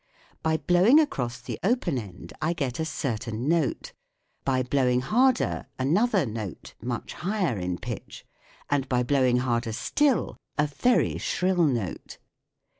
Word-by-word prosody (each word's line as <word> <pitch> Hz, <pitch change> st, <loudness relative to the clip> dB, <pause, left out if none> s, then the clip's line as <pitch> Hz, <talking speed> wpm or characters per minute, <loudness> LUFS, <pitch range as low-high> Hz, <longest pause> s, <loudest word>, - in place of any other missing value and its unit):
By 160 Hz, 0 st, +1 dB
blowing 185 Hz, -, +5 dB
across 125 Hz, -, -1 dB
the 125 Hz, -, -6 dB
open 195 Hz, -, +1 dB
end 95 Hz, -5 st, -10 dB
I 160 Hz, +2 st, +1 dB
get 135 Hz, -6 st, -3 dB
a 160 Hz, -, 0 dB
certain 125 Hz, -4 st, -3 dB
note, 170 Hz, -, 0 dB, 0.5 s
by 130 Hz, -1 st, +1 dB
blowing 125 Hz, -1 st, +2 dB
harder 250 Hz, -, +2 dB
an 135 Hz, +5 st, +1 dB
other 210 Hz, -, +3 dB
note 110 Hz, -5 st, -6 dB
much 120 Hz, +1 st, -4 dB
higher 180 Hz, -, -1 dB
in 90 Hz, 0 st, -2 dB
pitch, -, -, -7 dB, 0.4 s
and 140 Hz, -2 st, 0 dB
by 125 Hz, -1 st, +2 dB
blowing 130 Hz, -2 st, +3 dB
harder 120 Hz, -2 st, 0 dB
still 285 Hz, -, +1 dB, 0.2 s
a 150 Hz, -, +3 dB
very 195 Hz, -, +1 dB
shrill 180 Hz, -2 st, +1 dB
note. 120 Hz, -, -2 dB
140 Hz, 140 wpm, -26 LUFS, 120-180 Hz, 0.5 s, blowing